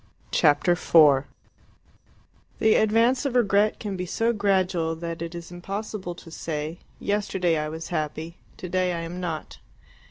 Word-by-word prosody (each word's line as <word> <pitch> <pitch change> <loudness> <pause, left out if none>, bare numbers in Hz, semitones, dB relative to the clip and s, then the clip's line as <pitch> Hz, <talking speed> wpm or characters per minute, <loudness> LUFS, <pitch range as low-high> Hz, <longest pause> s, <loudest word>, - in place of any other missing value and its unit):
Chapter 160 +4 +4
4 145 -5 +5 1.3
The 220 0 +4
advance 230 +5 +3
of 275 -4 -2
regret 210 -3 +3
can 205 -3 -4
be 180 0 -4
so 230 +6 +1
gradual 185 -5 +1
that 170 0 -6
it 170 0 -5
is 170 0 -8
impossible 195 0 -5
to 170 -1 -13
say 155 +1 -4 0.2
"yesterday 190 -4 0
I 150 0 -2
was 160 +1 -6
happy, 160 +1 -3 0.2
today 180 0 -1
I 170 - -3
am 170 +2 -6
not." 165 -3 -5
175 Hz, 145 wpm, -25 LUFS, 165-205 Hz, 1.3 s, 4